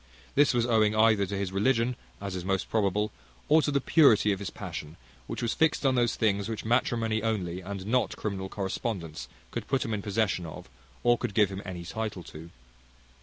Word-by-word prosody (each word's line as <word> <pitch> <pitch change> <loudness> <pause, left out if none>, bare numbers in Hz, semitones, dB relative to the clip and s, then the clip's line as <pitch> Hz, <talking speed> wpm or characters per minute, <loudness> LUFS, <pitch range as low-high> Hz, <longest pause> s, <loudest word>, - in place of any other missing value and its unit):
This 145 +1 +5
was 120 -3 +1
owing 110 -3 +3
either 110 -2 +4
to 100 +1 -3
his 95 -1 -2
religion, 115 +4 +2 0.2
as 100 -2 -5
is 90 - -4
most 95 0 -1
probable, 105 -1 +1 0.4
or 155 +1 +6
to 150 - 0
the 140 -1 +2
purity 125 -8 +5
of 95 - -1
his 100 - -4
passion, 75 +2 -7 0.3
which - - -4
was 120 - 0
fixed 160 -2 +2
on 135 - +4
those 120 -3 +2
things 100 -1 +1
which 110 -1 -4
matrimony 115 -2 +1
only, 95 -5 -2
and 95 0 -6
not 125 +4 +1
criminal 95 -3 -3
correspondence, 95 -4 -4 0.2
could - - -5
put 135 +1 0
him 115 - -2
in 105 - -2
possession 100 -4 0
of, 80 - -9 0.4
or 120 0 +4
could 100 - -3
give 105 -3 +4
him 95 0 -5
any 90 -3 -6
title 105 -1 -4
to. 80 +1 -10
105 Hz, 200 wpm, -28 LUFS, 95-115 Hz, 0.4 s, or